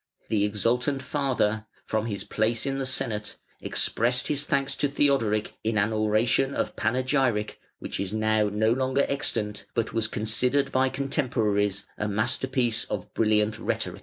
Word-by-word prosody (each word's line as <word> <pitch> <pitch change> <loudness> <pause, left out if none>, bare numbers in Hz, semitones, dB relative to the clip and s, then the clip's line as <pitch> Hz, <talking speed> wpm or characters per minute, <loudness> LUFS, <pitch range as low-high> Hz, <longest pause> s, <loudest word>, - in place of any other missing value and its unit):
The 105 -2 +2
exultant 120 +6 0
father, 120 -7 0 0.2
from 110 +1 -1
his 100 -3 -3
place 110 +1 0
in 135 0 -2
the 135 - 0
Senate, 105 -4 -1 0.2
expressed 125 +3 +1
his 150 0 +1
thanks 140 -1 0
to 145 - +2
Theodoric 130 -7 +1
in 110 -1 0
an 105 +2 +2
oration 110 +5 +2
of - - -2
panegyric, 125 -2 0 0.2
which - - -5
is 100 -1 -2
now 110 -1 +1
no 110 +2 +2
longer 130 +2 +1
extant, 105 -7 -1
but 115 -1 -1
was 115 -1 +1
considered 115 +6 +1
by 130 0 +2
contemporaries 115 -8 0
a 105 - -1
masterpiece 120 +2 +1
of 100 -3 -6
brilliant 110 0 +2
rhetoric. - - -3
115 Hz, 150 wpm, -26 LUFS, 105-130 Hz, 0.2 s, The